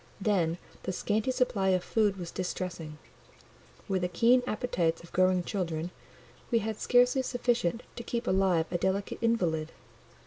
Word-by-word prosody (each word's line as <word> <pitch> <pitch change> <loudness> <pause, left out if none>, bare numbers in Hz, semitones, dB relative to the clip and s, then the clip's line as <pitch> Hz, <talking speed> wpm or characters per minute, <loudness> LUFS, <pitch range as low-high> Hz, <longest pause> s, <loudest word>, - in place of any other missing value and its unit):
Then 180 -5 +1 0.2
the - - -3
scanty 210 +5 -1
supply 250 -7 +1
of 185 -1 +2
food 210 -3 +1
was 175 -2 -6
distressing: 180 -4 -4 0.9
with 190 -2 0
the 180 - +1
keen 230 +8 +4
appetites 175 -8 -1
of 170 - -15
growing 185 -1 +3
children, 175 -4 -3 0.6
we 235 - +3
had 220 -1 -2
scarcely 250 +2 +4
sufficient 240 -5 0
to - - -4
keep 235 0 -3
alive 185 -3 +2
a 175 - 0
delicate 190 +2 -1
invalid. 175 -9 +1
190 Hz, 145 wpm, -30 LUFS, 175-230 Hz, 0.9 s, keen